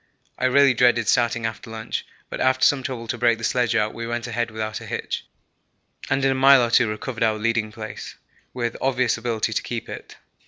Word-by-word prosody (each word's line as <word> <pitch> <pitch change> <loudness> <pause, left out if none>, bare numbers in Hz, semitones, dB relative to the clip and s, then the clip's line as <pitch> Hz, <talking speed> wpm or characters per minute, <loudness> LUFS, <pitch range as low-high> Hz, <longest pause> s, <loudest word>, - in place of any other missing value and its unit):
I - - 0
really 135 +1 +5
dreaded 120 -2 +3
starting 120 -2 +2
after 115 0 -5
lunch, 110 0 -5 0.2
but - - -6
after 130 0 +3
some 140 -2 +3
trouble 125 -3 -5
to 120 +1 -3
break 120 -1 +3
the 115 - -11
sledge 120 0 +1
out, 105 -1 +1
we 115 0 -6
went 120 0 -3
ahead 120 -1 -2
without 110 0 -4
a - - -9
hitch, - - -4 0.8
and 135 +1 +1
in 135 - +3
a - - +2
mile 135 -1 +6
or 120 - -1
two 125 0 +4
recovered 115 +3 -5
our 110 -1 +2
leading 110 0 0
place 110 0 -8 0.4
with 120 -2 -3
obvious 125 -2 +1
ability 115 -1 -1
to - - 0
keep 115 -1 -5
it. - - -9
120 Hz, 210 wpm, -23 LUFS, 110-125 Hz, 0.8 s, mile